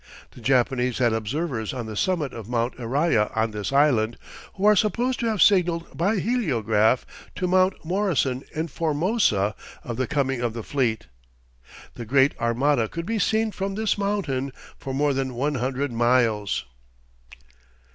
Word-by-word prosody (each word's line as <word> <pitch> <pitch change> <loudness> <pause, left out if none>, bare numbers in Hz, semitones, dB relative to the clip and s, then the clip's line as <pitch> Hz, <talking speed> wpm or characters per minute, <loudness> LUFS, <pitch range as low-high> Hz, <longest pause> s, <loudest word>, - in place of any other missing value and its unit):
The - - -14
Japanese 125 0 +1
had 120 -3 +2
observers 115 +1 -3
on 120 -3 -4
the 110 -1 -6
summit 160 - 0
of 115 -2 -8
Mt. 120 0 0
Iraya 125 -2 +1
on 110 0 +1
this 105 +3 -4
island, 130 -6 +3 0.4
who 200 0 -2
are 210 0 +7
supposed 240 +5 +1
to 235 - 0
have 215 -5 +3
signaled 175 -4 +2
by 195 +7 +1
heliograph 125 - +1 0.3
to 180 - -1
Mt. 185 -1 +2
Morrison 160 - 0
in 160 +2 -3
Formosa 155 - +1 0.3
of 120 -2 -5
the 130 -2 -1
coming 135 -3 -1
of 120 -2 -1
the 115 -1 -6
fleet. 120 -5 -1 0.9
The 120 - -7
great 135 +3 +3
armada 120 +1 +1
could 170 0 -5
be 225 +2 -1
seen 220 +2 +1
from 195 0 -4
this 220 0 0
mountain 185 -11 -2 0.2
for 135 - -7
more 145 +2 +1
than 130 -2 -2
one 145 +5 0
hundred 135 +2 -1
miles. 115 -3 +1
135 Hz, 155 wpm, -24 LUFS, 120-180 Hz, 0.9 s, are